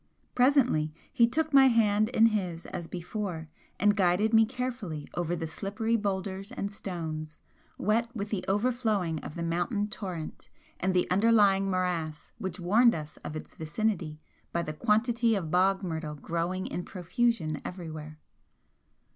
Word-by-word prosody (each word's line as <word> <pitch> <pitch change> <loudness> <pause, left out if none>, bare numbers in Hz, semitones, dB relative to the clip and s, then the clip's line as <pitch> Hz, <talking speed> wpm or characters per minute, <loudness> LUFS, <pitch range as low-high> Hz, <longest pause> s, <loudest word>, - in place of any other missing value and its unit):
Presently 250 - +3 0.2
he 235 - +5
took 310 +5 -1
my 270 -1 +8
hand 215 -3 +3
in 225 -2 +5
his 180 -5 -2
as 170 -2 -6
before, 175 -2 -5 0.3
and 205 +2 +4
guided 195 +3 +2
me 225 0 +6
carefully 240 - -4
over 175 0 -1
the 165 -1 -3
slippery 205 +7 -2
boulders 195 -2 -2
and 200 - -3
stones, 160 -6 -5 0.4
wet 225 +4 +1
with 205 -1 -3
the 200 -4 -2
overflowing 205 -6 +1
of 150 - -8
the 170 - -3
mountain 175 +5 0
torrent 185 -7 -6 0.3
and 185 0 0
the 180 - +3
underlying 200 -1 +4
morass 175 -5 -2
which 190 -2 -4
warned 225 +7 +4
us 150 -1 -7
of 155 - -7
its 155 - -7
vicinity 160 -1 -2 0.3
by 170 - 0
the 155 - -4
quantity 230 +5 +2
of 170 -6 -3
bog 190 +2 +3
myrtle 160 -4 -3
growing 170 +5 -2
in 180 - -4
profusion 180 -3 -1
everywhere. 155 -4 -7
190 Hz, 145 wpm, -29 LUFS, 165-220 Hz, 0.4 s, my